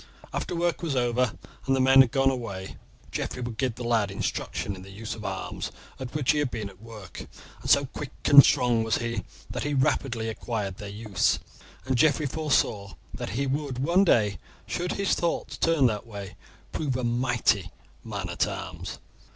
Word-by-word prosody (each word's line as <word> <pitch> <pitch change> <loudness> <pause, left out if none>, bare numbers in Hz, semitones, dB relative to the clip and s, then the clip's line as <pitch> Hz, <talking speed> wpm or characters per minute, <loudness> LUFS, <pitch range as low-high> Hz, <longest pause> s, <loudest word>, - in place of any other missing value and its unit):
After - - -2
work 170 0 0
was 160 -5 -1
over 120 -1 +2 0.3
and 135 - +4
the - - 0
men 135 +1 +8
had 130 - +4
gone 135 0 +3
away, 100 -7 -5 0.4
Geoffrey 125 - -3
would 115 -2 -5
give 130 -4 0
the 125 - -6
lad 115 -4 +2
instructions 100 0 -3
in 95 - -10
the 95 - -11
use 105 +3 -6
of 110 - -8
the 105 - -4
arms 95 -1 -4 0.3
at 130 0 -6
which 145 -4 +3
he 150 - +1
had 145 -3 +1
been 110 -4 -4
at 95 +1 -20
work, 110 -7 -9 0.3
and - - -5
so 140 0 +6
quick 140 +1 -6 0.2
and 140 -1 +10
strong 125 -4 +3
was 110 - +1
he 115 -4 -2 0.3
that - - -3
he 145 0 -1
rapidly 125 -3 +1
acquired 105 -3 -3
their 105 - -7
use, 105 -2 +1 0.5
and 130 -2 0
Geoffrey 155 +1 +4
foresaw 135 - 0 0.2
that - - -4
he 140 - +1
would 140 -1 -2
one 170 +9 +4
day, 105 - +3 0.3
should 175 +1 -2
his 200 -1 +1
thoughts 170 -1 -1
turn 165 -5 +3
that 110 -1 0
way, 100 -3 -8 0.4
prove 140 -5 -1
a 130 - -3
mighty 120 -6 +1 0.3
man - - -4
at - - 0
arms. - - -6
120 Hz, 190 wpm, -27 LUFS, 105-140 Hz, 0.5 s, and